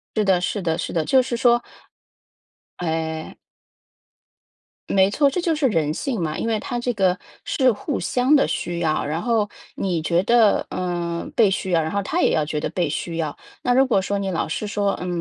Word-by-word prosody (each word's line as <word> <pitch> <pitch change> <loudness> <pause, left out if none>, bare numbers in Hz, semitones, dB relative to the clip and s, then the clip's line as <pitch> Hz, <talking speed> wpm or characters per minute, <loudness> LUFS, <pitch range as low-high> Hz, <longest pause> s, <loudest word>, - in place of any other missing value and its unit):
是 215 - +2
的 190 -3 +3
是 190 +3 -2
的 165 -1 0
是 - - -4
的， 160 -2 0
就 260 +6 +5
是 245 -1 -3
说 240 0 +3 1.1
哎。 160 -2 -3 1.5
没 190 0 +4
错， 280 +6 +3
这 320 - -2
就 335 -2 +1
是 290 -3 +2
人 155 -6 0
性 240 - -3
嘛， 155 -1 -2
因 - - -2
为 225 -2 0
它 245 - -4
这 245 +1 -1
个 190 -3 +2 0.3
是 260 -3 +3
互 260 +6 -3
相 255 +4 +2
的 280 - +4
需 175 -1 -2
要， 155 -2 0
然 160 +4 -2
后 225 -4 +1 0.3
你 175 -4 -1
觉 170 +2 +2
得， 230 -2 +4
呃， 175 -2 -3
被 215 -4 +6
需 190 -1 -2
要， 165 -2 +3
然 160 - -2
后 200 +2 -1
她 350 - -1
也 - - +3
要 155 - +1
觉 150 0 -2
得 - - -2
被 175 -5 -1
需 165 +3 -4
要。 155 -3 -3 0.2
那 245 - +2
如 265 +1 +4
果 195 -6 +2
说 200 +1 -2
你 195 -1 -2
老 170 - -1
是 205 +7 -3
说， 205 -1 0
呃， 180 - -6
190 Hz, 225 characters per minute, -22 LUFS, 165-235 Hz, 1.5 s, 被